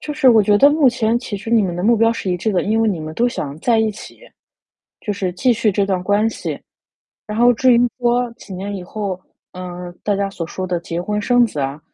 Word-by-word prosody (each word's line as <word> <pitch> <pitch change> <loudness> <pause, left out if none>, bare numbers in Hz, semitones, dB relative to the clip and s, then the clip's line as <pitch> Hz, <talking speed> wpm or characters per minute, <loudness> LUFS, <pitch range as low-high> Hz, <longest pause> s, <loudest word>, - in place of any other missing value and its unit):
就 300 - -5
是 265 - +4
我 225 -3 +6
觉 205 +1 +3
得 280 - +7
目 295 -2 +4
前 235 -1 +1
其 230 -4 -6
实 215 +3 -7
你 230 -2 +4
们 180 -3 -2
的 175 - -4
目 230 +4 +4
标 225 +1 +3
是 200 -4 -4
一 180 - 0
致 210 +5 -2
的， 180 - +1
因 220 +2 0
为 225 - +2
你 185 -6 -2
们 155 0 -7
都 240 +6 +2
想 145 -10 -5
在 230 +2 +2
一 220 0 +2
起， 210 - -12 0.8
就 210 - -3
是 195 -3 -3
继 245 +7 +2
续 215 -2 +1
这 200 0 +1
段 190 -2 -1
关 205 +3 +2
系。 - - -5 0.7
然 210 +1 -5
后 245 +1 +6
至 255 +2 +4
于 235 - +4 0.2
说 245 0 +1
几 225 -4 -13
年 200 +3 -5
以 185 - -7
后， 195 -1 -5 0.3
嗯， 180 -1 -8
大 205 - +1
家 200 0 -1
所 170 -4 -5
说 185 +2 -5
的 175 -1 -1
结 170 0 -4
婚 210 +3 -2
生 245 +2 +3
子 200 - -8
啊， 135 +2 -3
210 Hz, 275 characters per minute, -19 LUFS, 185-235 Hz, 0.8 s, 得